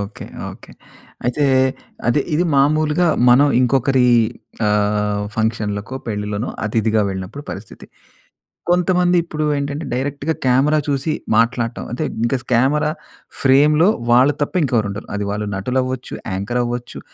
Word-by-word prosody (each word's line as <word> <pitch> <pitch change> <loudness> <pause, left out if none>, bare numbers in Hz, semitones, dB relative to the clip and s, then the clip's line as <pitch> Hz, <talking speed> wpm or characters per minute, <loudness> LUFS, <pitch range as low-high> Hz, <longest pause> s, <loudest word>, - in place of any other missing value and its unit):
Okay, 100 +1 -7 0.2
okay. - - -14 0.5
అయితే 135 +4 +1 0.6
అదే 120 +5 +3
ఇది 175 - +2
మామూలుగా 155 +4 +3 0.2
మనం 135 +4 +6
ఇంకొకరి 130 0 +2 0.6
ఆహ్, 105 0 +1
ఫంక్షన్‌లకో, 110 0 -2
పెళ్ళిలోనో 105 0 -3
అతిథిగా 110 0 +1
వెళ్ళినప్పుడు 95 +9 -6
పరిస్థితి. 100 +3 -9 0.8
కొంతమంది 180 0 +3
ఇప్పుడు 155 -2 -3
ఏంటంటే, 140 +2 -3
డైరెక్ట్‌గా 145 +4 -2
కెమెరా 140 +5 +3
చూసి 140 +2 0 0.2
మాట్లాడటం 115 0 0
అంటే, 120 - -3 0.2
ఇంక 125 +3 +1 0.2
కెమెరా 145 +6 +2 0.5
ఫ్రేమ్‌లో 150 +6 +5 0.2
వాళ్ళు 130 +4 +5
తప్ప 145 - -2
ఇంకెవరు 120 -7 +1
ఉండరు. 100 +2 -7
అది 105 - -3
వాళ్ళు 105 +1 -3
నటులవ్వచ్చు, 130 +5 -2 0.2
యాంకర్ 100 +6 -2
అవ్వచ్చు, 120 0 -5
125 Hz, 120 wpm, -19 LUFS, 105-145 Hz, 0.8 s, మనం